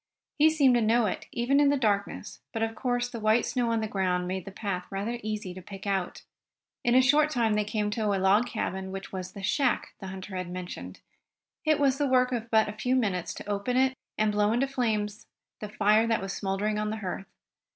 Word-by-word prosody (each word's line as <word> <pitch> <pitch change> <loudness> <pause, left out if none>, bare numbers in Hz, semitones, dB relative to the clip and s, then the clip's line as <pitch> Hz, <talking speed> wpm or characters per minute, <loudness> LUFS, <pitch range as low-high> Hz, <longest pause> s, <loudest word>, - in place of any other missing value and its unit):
He 310 +2 +7
seemed 285 -5 +4
to 240 - +3
know 225 +1 +3
it, 195 - -3
even 250 +4 +2
in 290 -1 +5
the 285 - +3
darkness, 205 -4 -1
but 225 - -1
of 225 0 -1
course 245 +1 -1
the 240 -1 -7
white 220 +2 +3
snow 245 -2 0
on 225 -1 +1
the 220 - -1
ground 180 -3 0
made 185 -1 -3
the 195 - -7
path 195 -3 -4
rather 210 +5 -3
easy 210 -4 -4
to 185 - -9
pick 195 +2 -10
out. 195 -3 -2 0.6
In 240 0 +3
a 260 - +7
short 295 +4 +4
time 235 -6 +1
they 210 0 +2
came 210 0 -1
to 220 0 -1
a 200 -1 +2
log 195 +5 +3
cabin, 190 -5 -3
which 195 0 -7
was 185 -1 -6
the 200 - -9
"shack" 250 +5 +1
the 195 - -7
hunter 190 +1 -7
had 180 -1 -4
mentioned. 180 0 -7 0.6
It 310 -1 +3
was 275 -1 +2
the 290 - +2
work 255 -1 +3
of 235 -2 -3
but 220 -1 +4
a 210 - -4
few 250 +4 0
minutes 195 -8 0
to - - -9
open 205 +5 -1
it, 260 0 +3 0.2
and 215 0 +2
blow 210 0 +2
into 245 +4 +2
flames 220 -5 -2 0.3
the 210 - -6
fire 215 +2 +3
that 225 -1 +2
was 195 0 -4
smouldering 205 +2 -1
on 210 0 -1
the 220 - -3
hearth. 195 -1 -5
215 Hz, 230 wpm, -28 LUFS, 195-245 Hz, 0.6 s, He